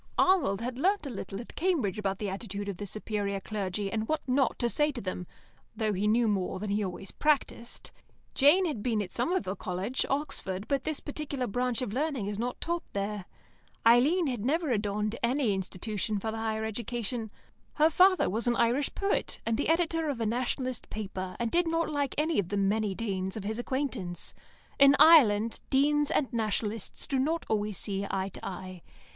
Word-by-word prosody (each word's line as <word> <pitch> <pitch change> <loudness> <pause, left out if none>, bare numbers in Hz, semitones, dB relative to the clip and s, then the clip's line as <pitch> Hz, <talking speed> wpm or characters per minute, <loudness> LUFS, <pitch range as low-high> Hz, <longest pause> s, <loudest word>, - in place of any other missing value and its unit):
Arnold 290 - +3
had 250 +1 -4
learnt 385 +1 +2
a 275 - -4
little 195 -2 -6
at 235 - -9
Cambridge 295 - 0
about 195 -2 -1
the 210 - -3
attitude 200 +1 -4
of 200 -3 -4
the 205 - -5
superior 205 -1 -2
clergy, 195 -1 -3
and 220 -1 -2
what 310 -2 -2
not 260 -1 +2
to 240 - +1
say 295 +5 +2
to 265 - -5
them, 185 -3 -5 0.5
though 215 -1 0
he 200 +2 0
knew 230 +2 +3
more 190 -3 0
than 205 0 -3
he 210 +1 +1
always 190 0 -5
practised. 285 -5 -1 0.4
Jane 305 +7 +5
had 295 -11 -2
been 225 -1 0
at 180 - -9
Somerville 240 - 0
College, 185 +7 -2
Oxford, 210 -9 -2
but 275 -2 0
this 310 -2 -1
particular 290 -3 -3
branch 245 +3 -1
of 210 - -4
learning 275 -4 -1
is 205 0 -3
not 245 +2 -2
taught 340 0 -2
there. 200 -1 -3 0.6
Eileen 275 +10 +5
had 245 -7 -2
never 305 +3 +1
adorned 210 0 -1
any 240 -2 +2
institution 205 +3 -3
for 220 +2 -3
the 225 - -5
higher 220 0 -1
education. 230 +1 -3 0.5
Her 310 +2 +4
father 370 +3 +5
was 225 +6 -1
an 240 - +3
Irish 240 +5 +1
poet, 395 0 0
and 225 - +1
the 285 - -1
editor 330 -1 +2
of 270 -5 -2
a 225 - 0
Nationalist 250 +2 -2
paper, 190 -3 -5
and 235 -1 -1
did 345 0 +2
not 330 -1 0
like 285 -2 -1
any 310 -1 +2
of 185 -3 -1
the 205 - -1
many 200 0 +1
Deans 190 -3 -2
of 210 - -5
his 215 +3 -3
acquaintance. 245 -9 -3 0.5
In 275 0 +8
Ireland, 230 -9 +6
Deans 295 +2 +3
and 265 -3 0
Nationalists 220 -1 -1
do 270 - 0
not 320 +5 0
always 210 -2 -1
see 200 -1 -1
eye 190 0 -1
to - - -11
eye. 185 -1 -6
230 Hz, 190 wpm, -29 LUFS, 200-280 Hz, 0.6 s, In